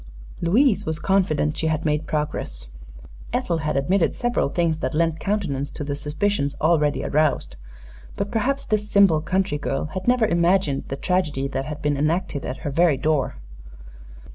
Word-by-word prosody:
Louise 215 +7 +3
was 160 -1 -1
confident 160 -7 +1
she 160 - -1
had 160 +1 -1
made 150 +1 0
progress. 105 - -3 0.6
Ethel 170 -2 0
had 150 -3 -1
admitted 170 +6 +1
several 240 - 0
things 165 0 0
that 130 -1 -2
lent 165 0 +1
countenance 165 -10 -2
to - - -6
the 145 0 -3
suspicions 150 +1 -1
already 150 -2 +2
aroused; 155 0 +1 0.6
but 200 0 -3
perhaps 260 +5 0
this 210 -1 -1
simple 195 -7 +5
country 185 -2 0
girl 135 -1 -2
had 185 +2 -5
never 245 -2 +4
imagined 170 -5 +2
the 135 - -3
tragedy 150 -4 0
that 135 0 -3
had 150 0 -6
been 145 -1 +1
enacted 155 0 -1
at 130 - -4
her 145 - -1
very 165 -1 +3
door. 150 - 0
160 Hz, 165 wpm, -23 LUFS, 145-190 Hz, 0.6 s, simple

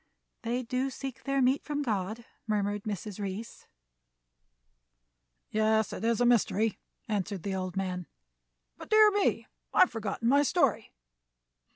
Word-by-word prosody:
"They 245 +1 -2
do 255 +3 -1
seek 265 -1 -7
their 275 -1 +2
meat 260 +3 +2
from 295 -1 -2
God," 215 0 -2 0.2
murmured 205 -1 -1
Mrs. 210 -1 -5
Reece. 200 +3 -6 1.8
"Yes, 220 0 +2
it - - -6
is 230 -1 +2
a 245 - +3
mystery," 225 -2 +2 0.3
answered 200 -4 -2
the 200 - -2
old 185 -1 -3
man. 180 -2 -3 0.7
"But, - - -11
dear 430 -1 +7
me, 410 0 +1 0.3
I - - +6
have 365 - +6
forgotten 225 0 -3
my 280 +3 +5
story. 280 - +1
225 Hz, 140 wpm, -29 LUFS, 200-260 Hz, 1.8 s, dear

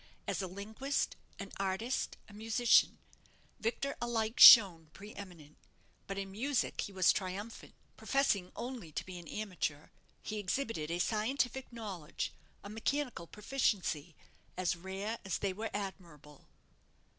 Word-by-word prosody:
As - - -2
a 190 - -3
linguist, 215 +9 -3 0.2
an 195 -1 -7
artist, 195 +6 -2
a 205 - -15
musician, 225 +3 +3 0.6
Victor 260 +5 -2
alike 230 -1 -1
shone 175 -9 +10
pre 205 +2 -10
eminent; 170 -7 -11 0.5
but 195 - -4
in 195 -1 -4
music 255 +7 -1
he - - -5
was 185 -2 +4
triumphant. 200 +4 -6 0.2
Professing 215 -10 +1
only 235 -8 -6
to - - -4
be 185 -1 -8
an 170 - -12
amateur, 180 -8 -4 0.3
he 215 -1 -4
exhibited 200 - -2
a 170 - -1
scientific 245 +7 -1
knowledge, 200 -9 -5 0.3
a - - -8
mechanical 235 -4 -2
proficiency, 195 - -1 0.4
as 185 -1 0
rare 195 +5 -5
as 195 - -2
they 195 -2 -1
were 220 +3 -4
admirable. 170 -8 -8
200 Hz, 135 wpm, -33 LUFS, 180-230 Hz, 0.6 s, shone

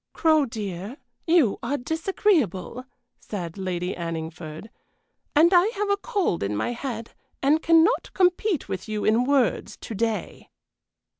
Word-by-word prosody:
"Crow, 310 -3 +3
dear, 210 +1 -6 0.3
you 320 - +3
are 270 +3 -1
disagreeable," 285 - 0 0.3
said 175 -6 -6
Lady 185 -2 -3
Anningford, 165 +2 -6 0.6
"and 335 +5 +6
I 355 +2 +6
have 405 0 0
a 400 - +2
cold 400 - -1
in 100 +1 -1
my 175 - -1
head 235 -2 -5 0.3
and 300 +4 +3
cannot 330 +8 +3
compete 365 - +2
with 185 +3 -5
you 215 -1 -2
in 225 +3 +3
words 270 -3 +1
to - - -8
day." 225 +1 -3
240 Hz, 135 wpm, -25 LUFS, -, 0.6 s, and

